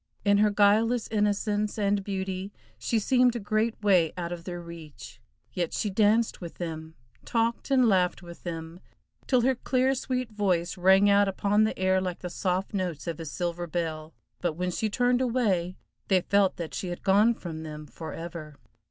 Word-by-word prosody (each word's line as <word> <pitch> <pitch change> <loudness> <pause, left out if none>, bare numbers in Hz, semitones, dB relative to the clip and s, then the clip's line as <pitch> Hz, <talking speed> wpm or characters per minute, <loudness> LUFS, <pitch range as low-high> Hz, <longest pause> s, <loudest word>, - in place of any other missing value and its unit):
In 205 0 +4
her 210 0 +5
guileless 215 +3 +3
innocence 210 0 0
and 200 -1 +1
beauty 190 0 -4 0.3
she 230 - 0
seemed 245 +2 +3
a - - -2
great 215 +2 -1
way 180 -6 +4
out 170 -1 -4
of 170 -1 -6
their 175 -1 -5
reach, 170 -3 -11 0.3
yet 175 -2 -2
she 210 - -1
danced 215 +3 +2
with 170 -2 -7
them, 160 -2 -6 0.3
talked 230 +2 -1
and 260 -3 +4
laughed 180 -4 +2
with 170 0 -11
them, 165 0 -6 0.5
till 255 -2 +3
her 260 +3 +3
clear, 255 +1 +1
sweet 255 -2 -3
voice 185 -5 0
rang 190 +2 +5
out 200 0 +5
upon 205 +2 +2
the 220 - -2
air 185 0 +2
like 180 -2 -4
the 180 - -5
soft 185 +3 -2
notes 180 -6 -3
of 170 -2 -4
a 165 - -5
silver 175 +2 -3
bell, 160 -2 -4 0.2
but 175 -3 -1
when 180 +3 -2
she 215 +5 -1
turned 245 +3 +2
away, 205 -8 0 0.3
they 190 -2 +3
felt 200 +1 +2
that 170 -2 -6
she 185 - -4
had 175 0 -6
gone 210 +4 +4
from 160 -5 -7
them 155 -1 -7
forever. 160 +2 -8
190 Hz, 180 wpm, -27 LUFS, 170-215 Hz, 0.5 s, her